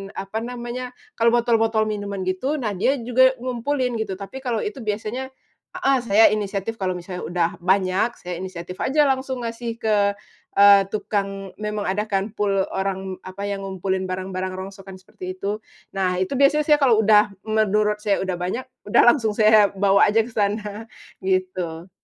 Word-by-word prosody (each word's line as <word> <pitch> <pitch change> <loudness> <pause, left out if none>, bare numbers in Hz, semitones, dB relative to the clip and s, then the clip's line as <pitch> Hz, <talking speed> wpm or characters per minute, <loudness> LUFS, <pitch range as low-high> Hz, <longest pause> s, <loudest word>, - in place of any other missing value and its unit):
apa 195 +3 -4
namanya, 245 +1 -6 0.3
kalo 230 0 +4
botol-botol 225 -2 +2
minuman 200 -2 -4
gitu 185 +11 -1
nah 215 -4 -1
dia 265 +9 +2
juga 260 +2 +4
ngumpulin, 255 0 -1 0.2
tapi 195 +6 -8
kalau 245 -4 -2
itu 415 -10 -4
biasanya 220 +5 -3 0.4
heeh 275 0 +2
saya 220 0 +6
inisiatif 205 +1 -2
kalau 185 -3 -1
udah 175 -1 -2
banyak, 190 +4 +1
saya 175 -1 -5
inisiatif 180 -1 -7
aja 290 0 +3
langsung 260 -1 -1
ngasih 230 0 -5
ke, 205 -2 +2 0.4
eee, 200 0 +7
tukang 195 -2 -3
memang 210 -2 -3
ada 210 +3 -1
kan 200 -1 -1
pul 205 -2 -1 0.2
orang, 190 -1 -3
apa, 200 +2 -5
yang 195 -1 -4
ngumpulin 190 0 -2
barang-barang 185 0 -4
rongsokan 190 0 -9
seperti 185 0 -8
itu, 205 +1 -1 0.3
nah 185 -2 -1
itu 220 +8 -1
biasanya 295 +2 +3
saya 300 - +7
kalau 245 -6 +4
udah 210 -1 +4 0.2
menurut 210 -1 +2
saya 210 -1 0
udah 185 -2 -2
banyak, 185 +9 -3 0.2
udah 205 - +4
langsung 225 -5 +2
saya 215 -1 +5
bawa 195 0 +4
aja 215 +2 +3
ke 225 - -7
sana, 210 0 -2 0.4
gitu. 185 -2 -2
205 Hz, 160 wpm, -22 LUFS, 190-230 Hz, 0.4 s, eee